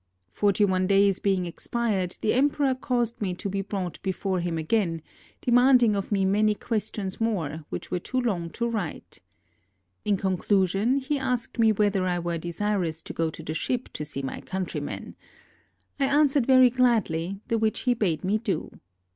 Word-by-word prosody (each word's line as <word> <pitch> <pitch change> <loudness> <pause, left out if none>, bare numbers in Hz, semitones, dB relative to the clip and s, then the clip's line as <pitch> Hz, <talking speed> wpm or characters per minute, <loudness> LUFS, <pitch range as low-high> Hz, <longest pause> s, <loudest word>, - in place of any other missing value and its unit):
Forty 205 - +2
one 185 -1 +1
days 195 -1 +4
being 190 -3 +1
expired, 190 0 -2
the 215 - +2
em 275 +4 +4
peror 270 -3 0
caused 240 -3 -1
me 185 -3 -1
to 190 - -5
be 195 0 -2
brought 190 -3 -4
before 190 0 -1
him 170 -1 -2
again, 165 -1 0 0.4
de 245 - -1
manding 245 -3 +5
of 195 +1 -3
me 195 -2 +2
many 210 +2 +3
questions 210 -3 -3
more, 165 -9 -1
which - - -6
were 180 - 0
too 255 +8 -2
long 190 -9 -1
to 235 +8 -2
write. 215 -9 -5 0.8
In 205 -1 +1
conclusion 195 +5 +1
he 280 +1 -1
asked 250 -2 -2
me 225 -1 +5
whether 200 -3 +1
I 180 -1 0
were 170 -1 -2
desirous 170 -1 -2
to - - -7
go 165 -1 0
to - - -9
the 155 - -4
ship 250 +9 -2
to - - -4
see 145 -2 -5
my 135 - -5
countrymen. 190 -1 -5 0.9
I 275 - +3
answered 280 -2 +3
very 255 -2 +7
gladly, 200 -8 +1
the 230 - +1
which 220 0 0
he 250 - +2
bade 195 -9 -1
me 200 +4 +1
do. 215 -3 -2
200 Hz, 180 wpm, -26 LUFS, 180-235 Hz, 0.9 s, very